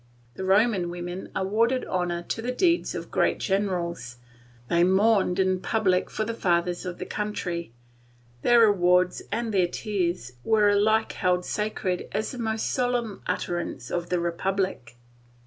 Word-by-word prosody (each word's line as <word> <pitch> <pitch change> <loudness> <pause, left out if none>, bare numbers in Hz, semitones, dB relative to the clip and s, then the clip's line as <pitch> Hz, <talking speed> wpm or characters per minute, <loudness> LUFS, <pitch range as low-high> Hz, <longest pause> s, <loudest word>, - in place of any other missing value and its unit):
The 190 - -6
Roman 195 -1 +3
women 175 +1 -6
awarded 225 +7 +1
honour 175 -2 -2
to 225 - -4
the 245 +2 -2
deeds 340 +6 +1
of - - -6
great - - +2
generals, 175 - -2 0.5
they 170 +4 +3
mourned 190 0 +3
in 185 -1 +2
public 190 -3 +1
for 215 - -2
the 230 - -3
fathers 175 -4 0
of 175 - -5
the - - -5
country, 180 - -4 0.7
their 240 -1 +5
awards 180 -3 +3
and 230 -2 -2
their 185 -3 +3
tears 175 - -2
were 215 -2 +4
alike 215 +2 +3
held 180 -1 0
sacred 210 -4 -2
as 215 - -1
the 250 - -8
most 220 -1 -1
solemn 245 -5 -1
utterance 175 -1 -3
of 175 0 -2
the 180 - +1
Republic. 170 -7 -2
190 Hz, 145 wpm, -26 LUFS, 175-220 Hz, 0.7 s, their